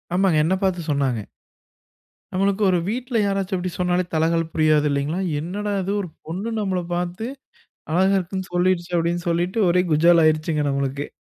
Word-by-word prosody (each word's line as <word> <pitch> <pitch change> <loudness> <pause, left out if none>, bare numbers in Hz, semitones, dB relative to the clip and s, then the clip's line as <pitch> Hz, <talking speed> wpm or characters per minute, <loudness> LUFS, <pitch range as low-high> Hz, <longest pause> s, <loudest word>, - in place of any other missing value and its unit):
ஆமாங்க 185 -4 +3
என்ன 180 +4 +2
பாத்து 185 -2 +1
சொன்னாங்க. 130 -7 0 1.1
நம்மளுக்கு 195 +2 +1
ஒரு 180 -2 +2
வீட்ல் 245 +1 -2
யாராச்சும் 195 -1 -1
அப்டி 180 0 -3
சொன்னாலே 180 0 +1
தலகால் 165 0 +1
புரியாது 155 -1 +3
இல்லிங்களா! 140 +5 -1 0.2
என்னடா 205 +6 -3
இது 195 - -2
ஒரு 180 - -6 0.2
பொண்ணு 190 +8 -4
நம்மள 190 -3 -1
பாத்து, 180 +5 -3 0.7
அழகா 190 +3 +3
இருக்குன்னு 190 +1 -5
சொல்லிடுச்சு! 180 -1 +1
அப்டின்னு 170 +2 -1
சொல்லிட்டு 175 +5 -1
ஒரே 180 +1 +3
குஜால் 170 +2 +5
ஆயிருச்சுங்க 155 -1 +1
நம்மளுக்கு. 140 +1 -2
175 Hz, 150 wpm, -22 LUFS, 160-190 Hz, 1.1 s, குஜால்